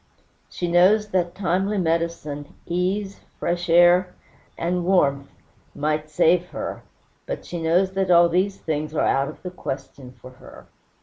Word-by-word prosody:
She 175 - -4
knows 190 +5 +4
that 180 -2 -1
timely 190 +2 0
medicine, 165 -4 -2
ease, 190 +3 -2 0.2
fresh 175 0 -2
air, 175 +2 +5 0.4
and 175 +1 -1
warmth 140 -7 +1 0.5
might 155 +1 -2
save 170 +3 +2
her; - - -6 0.5
but - - -5
she 175 -1 -6
knows 175 +4 +2
that 190 -1 -1
all 170 -1 +6
these 185 +3 0
things 155 0 -4
are - - +1
out 135 +1 +1
of 155 - -10
the 180 - -5
question 135 -5 -7
for 130 - -12
her. 130 - -15
175 Hz, 145 wpm, -23 LUFS, 155-185 Hz, 0.5 s, all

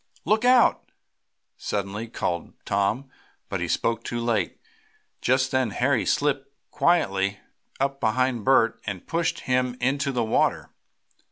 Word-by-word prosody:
"Look 215 +5 +2
out!" 250 -1 +4 0.7
suddenly 100 +2 -3
called 85 -6 -3
Tom, 100 +7 0 0.4
but - - -2
he - - -1
spoke 115 0 0
too 120 - -3
late. 115 -3 -1 0.6
Just 130 +1 +2
then 130 -3 +1
Harry 125 +3 +1
slipped 140 -2 0 0.2
quietly 100 - +1 0.4
up 135 0 0
behind 125 0 +1
Bert 130 -3 +3
and 95 -4 -4
pushed 170 0 -1
him 125 -1 0
into 140 +2 0
the 125 -3 0
water. 110 - +1
125 Hz, 125 wpm, -25 LUFS, 110-140 Hz, 0.7 s, out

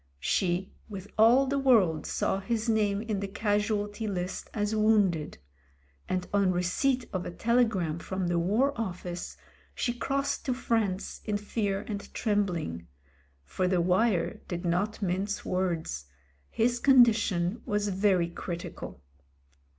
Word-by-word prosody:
She, 180 - 0 0.2
with 200 -1 -7
all 235 +5 +6
the 275 +1 0
world, 205 - +3
saw 190 - 0
his 225 +3 -2
name 210 -2 +1
in 215 -3 -2
the 200 - -3
Casualty 205 +1 -1
List 185 -2 -4
as 210 0 -1
wounded; 205 -8 +2 0.7
and 185 -1 -1
on 200 -2 +3
receipt 230 +9 +1
of 185 -2 -1
a - - -5
telegram 200 -6 +1
from 190 +1 -3
the 175 0 +1
War 220 +11 +2
Office, 180 -3 -5 0.4
she 240 - -1
crossed 275 +3 -1
to 255 - 0
France 215 -6 -1
in 210 -2 -1
fear 205 -1 -2
and 205 -2 -5
trembling 175 - -1 0.3
— 70 0 -36
for 180 - -1
the 180 -1 +2
wire 185 +3 +1
did 175 0 -4
not 195 +5 0
mince 195 +3 -1
words; 170 - -2 0.4
his 240 +2 +1
con 265 -2 +7
dition 215 -2 0
was 205 0 0
very 190 -3 +2
critical. 170 - -7
200 Hz, 140 wpm, -29 LUFS, 180-225 Hz, 0.7 s, con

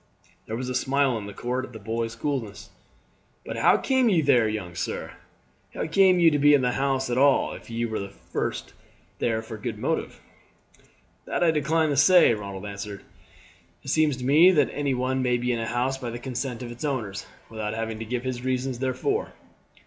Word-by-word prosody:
There 110 - -3
was 125 +2 -4
a 130 - -3
smile 135 0 +1
in 100 - -8
the - - -7
court 125 +4 -3
at 130 - -9
the - - -7
boy's 115 +2 -3
coolness. 115 -6 -4 0.7
"But - - -5
how - - +5
came 260 -3 +2
ye 180 -6 +3
there, 125 -6 +4
young 100 -5 -5
sir? 85 - -4 0.6
How - - -2
came 185 +2 +4
ye 165 -2 +6
to 145 - +1
be 145 +1 +6
in 135 - +1
the 125 - +2
house 135 -1 0
at 120 - +1
all, 140 0 +3
if - - -11
ye 115 0 -2
were 110 -2 -3 1.2
there 110 -1 0
for 110 - -9
a 105 - -12
good - - -4
motive?" - - -2 1.1
"That - - -1
I 165 - +5
decline 155 +1 +1
to 140 - 0
say," 160 -1 +6
Ronald 100 -2 -6
answered. 100 0 -7 0.8
"It - - -7
seems 155 -4 +2
to 125 - -6
me 155 +7 +7
that 150 -7 +3
any 140 -2 -1
one 130 +1 -1
may 125 -1 +2
be 125 +1 -1
in 115 - -2
a 115 - -3
house 125 +3 -1
by 125 -3 -4
the 120 - -5
consent 125 0 -4
of 120 - -7
its 120 +5 -9
owners, 115 -9 -3 0.2
without 110 -1 -4
having 110 -1 -4
to 115 - -5
give 120 +2 -3
his 125 -1 -4
reasons 130 -1 -2
therefor." 410 - -1
125 Hz, 205 wpm, -25 LUFS, 115-140 Hz, 1.2 s, me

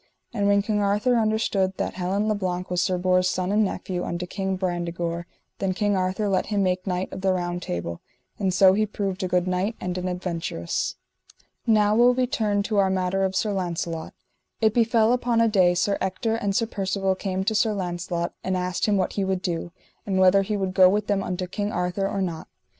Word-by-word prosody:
And 200 -3 0
when 200 0 +4
King 210 0 0
Arthur 205 +5 +2
understood 215 -4 +1
that - - -2
Helin 190 +3 -1
le 215 - +2
Blank 185 -2 -3
was 180 -1 +1
Sir 185 +1 +1
Bors' 185 0 +2
son, 185 +1 -1
and 215 +1 +3
nephew 185 -2 -3
unto 175 +1 -3
King 190 +1 -3
Brandegore, 175 -2 -3 0.3
then 190 -1 -1
King 205 0 +1
Arthur 185 +3 0
let 190 -2 +1
him 205 -2 +1
make 185 +1 -1
knight 180 0 -2
of - - -6
the 190 0 +2
Round 175 -1 -2
Table; 85 - -4 0.4
and 195 -2 +1
so 185 +1 +6
he 215 +2 +1
proved 195 -2 -3
a 185 - 0
good 180 0 +1
knight 185 +5 0
and 180 0 -3
an 180 - -3
adventurous. 170 - -3 0.7
Now 210 -2 +4
will 245 +2 +5
we 255 0 +2
turn 215 -6 0
to 210 0 -2
our 195 -1 +4
matter 190 0 0
of 190 0 -1
Sir 210 +2 +1
Launcelot. 170 -3 -3 0.4
It 220 -2 +3
befell 230 0 +3
upon 245 -2 +1
a 230 - +5
day 185 -5 +3
Sir 200 +3 +1
Ector 190 +4 -1
and 205 -3 -1
Sir 230 - +2
Percivale 195 -2 -1
came 190 0 -3
to 220 +3 0
Sir 220 +1 +2
Launcelot 175 -2 -3
and 185 0 0
asked 180 +2 -1
him 205 -1 +3
what 185 - 0
he 200 - -1
would 190 -1 -1
do, 170 -1 -3 0.4
and 195 -2 0
whether 190 +1 +5
he 205 +2 -2
would 190 -2 -2
go 185 -1 +7
with 210 +2 0
them 200 -1 0
unto 185 -1 -3
King 205 +3 -3
Arthur 180 +2 -1
or 195 -1 -1
not. 165 -3 -4
190 Hz, 215 wpm, -24 LUFS, 180-205 Hz, 0.7 s, go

